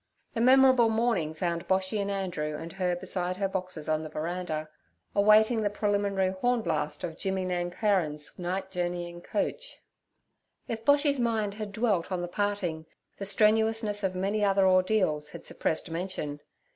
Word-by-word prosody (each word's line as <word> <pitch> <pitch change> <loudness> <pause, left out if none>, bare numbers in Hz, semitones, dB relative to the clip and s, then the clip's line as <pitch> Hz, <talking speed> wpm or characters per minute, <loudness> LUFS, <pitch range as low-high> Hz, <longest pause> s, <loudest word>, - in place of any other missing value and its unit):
The 230 - -1
memorable 260 -1 +6
morning 220 -9 0
found 170 0 -2
Boshy 190 +2 +1
and 200 - -2
Andrew 175 -6 -2
and 165 +2 -8
her 180 -2 0
beside 180 0 -2
her 195 0 0
boxes 185 -5 -4
on 155 0 +1
the 155 - -6
veranda, 155 0 -3 0.5
awaiting 215 +3 +5
the 205 - +1
preliminary 200 -2 0
horn 235 +5 0
blast - - -2
of 165 0 -5
Jimmy 190 -1 -1
Nancarron's 175 -4 -1
night 185 +2 -3
journeying 175 -1 -3
coach. - - -3 0.9
If 225 -1 -4
Boshy's 285 +1 +3
mind 220 -4 0
had 210 -1 -6
dwelt 200 -5 0
on 180 -1 -1
the - - -3
parting, 180 -5 -2 0.3
the 200 - -4
strenuousness 215 +1 +2
of 185 -1 0
many 200 +3 0
other 195 -1 +4
ordeals 185 -5 +2
had - - -9
suppressed 160 +1 -2
mention. 165 -4 -3
190 Hz, 155 wpm, -28 LUFS, 175-215 Hz, 0.9 s, memorable